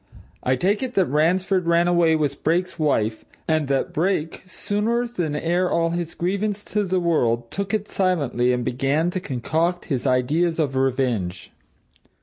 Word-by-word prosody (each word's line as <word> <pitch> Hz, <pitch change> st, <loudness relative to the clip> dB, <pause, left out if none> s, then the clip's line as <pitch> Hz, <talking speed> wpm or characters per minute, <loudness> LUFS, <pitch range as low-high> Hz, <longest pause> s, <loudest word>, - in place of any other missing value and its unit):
I 130 Hz, -, +1 dB
take 195 Hz, +10 st, +1 dB
it 255 Hz, -2 st, -4 dB
that 190 Hz, -, +4 dB
Ransford 180 Hz, +5 st, +1 dB
ran 170 Hz, +1 st, +3 dB
away 170 Hz, -2 st, +3 dB
with 145 Hz, -3 st, -2 dB
Brake's 175 Hz, +3 st, 0 dB
wife, 115 Hz, -8 st, 0 dB, 0.2 s
and 155 Hz, -2 st, +1 dB
that 135 Hz, -1 st, -1 dB
Brake, 165 Hz, -1 st, -1 dB
sooner 215 Hz, +5 st, -1 dB
than 175 Hz, -11 st, -3 dB
air 175 Hz, +4 st, 0 dB
all 165 Hz, 0 st, +1 dB
his 170 Hz, -1 st, -3 dB
grievance 200 Hz, +3 st, -1 dB
to 210 Hz, 0 st, +2 dB
the 185 Hz, -1 st, 0 dB
world, 120 Hz, -9 st, 0 dB
took 200 Hz, 0 st, -3 dB
it 210 Hz, -1 st, -1 dB
silently 145 Hz, -10 st, +1 dB
and 125 Hz, -1 st, -1 dB
began 135 Hz, +7 st, 0 dB
to 185 Hz, -, -2 dB
concoct 165 Hz, +3 st, -1 dB
his 130 Hz, +1 st, -1 dB
ideas 150 Hz, +7 st, +1 dB
of 145 Hz, -5 st, 0 dB
revenge. 125 Hz, -9 st, -1 dB
165 Hz, 160 wpm, -23 LUFS, 135-185 Hz, 0.2 s, that